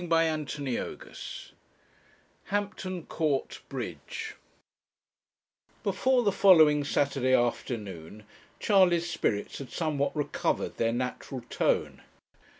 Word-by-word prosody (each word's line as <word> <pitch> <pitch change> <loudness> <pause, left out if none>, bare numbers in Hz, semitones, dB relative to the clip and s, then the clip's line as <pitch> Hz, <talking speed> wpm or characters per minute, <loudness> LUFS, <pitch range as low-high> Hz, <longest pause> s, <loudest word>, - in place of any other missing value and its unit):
CHAPTER 165 -3 +1
XXI 140 -5 -5 0.9
HAMPTON 195 -4 -3
COURT 150 -5 -1
BRIDGE 445 -1 -5 1.5
Before 245 +5 +2
the 205 - +3
following 160 -7 +6
Saturday 135 -2 +2
afternoon 105 -6 -2 0.4
Charley's 180 -5 +4
spirits 135 -11 -1
had 135 -3 -7
somewhat 150 -1 -1
recovered 145 -1 -1
their 115 0 +2
natural 125 +1 -3
tone. - - 0
150 Hz, 85 wpm, -29 LUFS, 130-185 Hz, 1.5 s, following